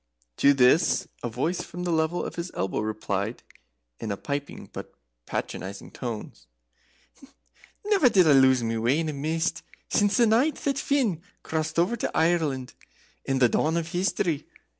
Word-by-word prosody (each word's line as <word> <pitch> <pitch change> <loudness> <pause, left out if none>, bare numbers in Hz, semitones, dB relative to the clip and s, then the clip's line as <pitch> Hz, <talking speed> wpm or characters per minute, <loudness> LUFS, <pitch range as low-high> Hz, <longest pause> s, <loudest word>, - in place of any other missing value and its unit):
To 140 0 +5
this 130 +6 +4
a 120 - -3
voice 135 +10 -1
from 175 +1 -7
the 175 - -1
level 160 +1 0
of - - -5
his 170 +1 -4
elbow 95 +1 -1
replied, 105 0 -3 0.6
in - - -5
piping 140 +4 -5
but - - -8 0.3
patronizing 100 +2 -5
tones; 115 -4 -7 1.4
"Never 395 -11 +4
did 185 -7 +5
I - - +6
lose 130 -2 +5
my 115 0 -1
way 120 +6 +2
in 160 -1 -1
a - - -3
mist 160 +4 -1 0.3
since 205 -1 +2
the 240 - +5
night 240 +8 +3
that 275 -1 -1
Finn 245 - +1 0.2
crossed 155 0 -2
over 180 +8 +2
to - - -3
Ireland 160 -6 +1 0.5
in 135 - 0
the 125 -2 +5
Dawn 160 +7 +1
of 165 -1 -2
History. 175 -3 -1
160 Hz, 160 wpm, -26 LUFS, 130-180 Hz, 1.4 s, I